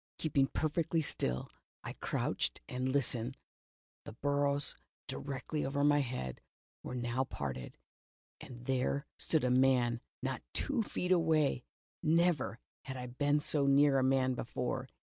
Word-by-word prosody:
Keeping 140 -4 +2
perfectly 160 +3 0
still, 65 - -1 0.3
I - - -5
crouched - - -1
and 130 +1 -2
listened. 130 -2 0 0.7
The - - -8
boughs 145 +2 +1 0.3
directly 140 +2 -3
over 140 +1 0
my 145 0 +5
head 120 - -3 0.4
were - - -6
now 120 +1 0
parted, 65 - -5 0.6
and 125 -1 -10
there 135 +2 0
stood 160 -4 +2
a 125 - +2
man, 125 -2 +3 0.2
not - - -2
two 280 -5 +1
feet 185 -3 -2
aw^ay! 160 -7 +3 0.4
Never 165 - +2 0.3
had 130 -1 -5
I 125 - -5
been 145 +4 +1
so 145 -1 +1
near 140 0 +5
a - - +2
man 130 0 +3
before. 125 +1 -3
135 Hz, 135 wpm, -34 LUFS, 125-145 Hz, 0.7 s, my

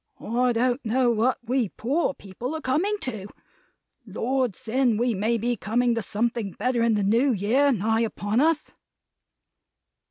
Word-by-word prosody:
I 245 +3 0
don't 245 +3 0
know 245 +2 +2
what 235 +3 +1
we 245 -4 0
poor 280 - -1
people 230 +9 -6
are 315 - -5
coming 335 +11 0
to. 215 -6 -4 0.8
Lord 240 +1 -1
send 235 +1 0
we 240 0 +1
may 220 +4 0
be 240 +2 -1
coming 235 +4 0
to 230 - -1
something 220 0 -2
better 240 +2 -1
in 230 -1 +3
the 205 - 0
New 230 +7 +3
Year 245 +7 +2
nigh 225 0 +1
upon 215 0 -1
us!" 310 +1 +1
235 Hz, 155 wpm, -25 LUFS, 220-255 Hz, 0.8 s, in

